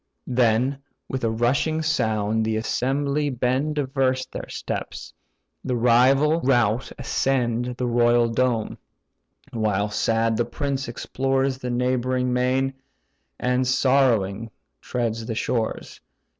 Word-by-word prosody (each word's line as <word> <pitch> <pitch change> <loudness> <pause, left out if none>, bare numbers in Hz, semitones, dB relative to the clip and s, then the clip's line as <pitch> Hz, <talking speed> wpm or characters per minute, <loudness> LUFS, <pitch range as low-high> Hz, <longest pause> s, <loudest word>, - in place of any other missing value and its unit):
Then, 125 +2 +1 0.3
with 130 -1 -4
a 115 - +2
rushing 135 +8 0
sound 110 -7 0
the 110 0 0
assembly 140 +5 0
bend 130 +4 0
Diverse 130 -2 0
their - - -8
steps: - - -5 0.5
the 125 - -1
rival 130 +7 +4
rout 120 -2 +1
ascend 125 -3 -1
The 125 - -1
royal 120 0 +3
dome; 115 -1 -1 0.7
while 105 -2 0
sad 115 +1 +1
the 120 - +1
prince 135 +2 -3
explores 135 +2 -1
The 125 - -4
neighbouring 125 +1 0
main, 130 +2 +1 0.7
and 125 0 +1
sorrowing 120 -6 +2 0.3
treads 115 -2 -3
the 115 - -3
shores. 115 0 -3
125 Hz, 115 wpm, -23 LUFS, 115-135 Hz, 0.7 s, rival